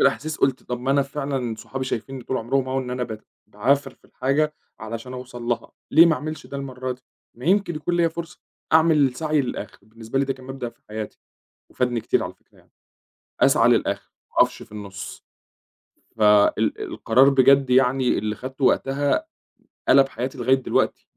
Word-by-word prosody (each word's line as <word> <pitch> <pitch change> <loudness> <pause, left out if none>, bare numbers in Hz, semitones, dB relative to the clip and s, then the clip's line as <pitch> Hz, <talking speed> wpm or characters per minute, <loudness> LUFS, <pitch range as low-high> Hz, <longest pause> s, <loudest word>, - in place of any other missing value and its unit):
الأحاسيس 150 +3 +1
قُلت 135 -1 +1
"طَب 125 0 -5
ما 135 +2 -1
أنا 140 0 +4
فعلًا 135 -4 -3
صحابي 130 +4 -6
شايفينّي 130 +1 -4
طُول 130 - -2
عُمرهم 130 +3 0
أهو 135 +1 0
إن 125 -1 -4
أنا 125 0 -2
بت 110 -3 -6 0.2
باعافر 135 +7 +1
في - - -37
الحاجة 150 +4 0 0.3
علشان 115 +3 -6
أوصَل 125 -1 -8
لها، 120 0 -2 0.2
ليه 165 +2 +8
ما 165 - +4
أعملش 155 +1 -6
ده 140 - -7
المرّة 130 -2 -4
دي؟ 125 0 -14 0.3
ما 120 - -11
يمكن 190 -1 +2
يكون 175 +3 -1
ليَّ 170 -1 +3
فرصة 170 +1 -8 0.3
أعمل 160 0 +5
السّعي 150 +3 0
للآخِر." 120 -5 -5
بالنسبة 110 +4 -5
لي 140 - +2
ده 135 - -1
كان 130 -1 -14
مبدأ 135 -2 -5
في - - -19
حياتي 110 0 -6 0.5
وفادني 125 -2 0
كتير - - +1
على - - -6
الفكرة - - -29
يعني، - - -26 0.7
أسعى - - +5
للآخِر - - 0 0.2
ما - - -29
أقَفش - - +1
في - - -20
النُّص 100 -2 -8 0.9
ف 110 - -2
ال 105 -1 +4
القرار 130 +4 +3
بجد 135 0 +5
يعني 130 0 +3
اللي 105 +1 -2
خدته 130 +2 -5
وقتها 140 - +1 0.6
قلَب 135 -1 +7
حياتي 130 +1 -4
لغاية 130 +2 +3
دلوقتي 130 - -1
130 Hz, 180 wpm, -23 LUFS, 120-140 Hz, 0.9 s, ليه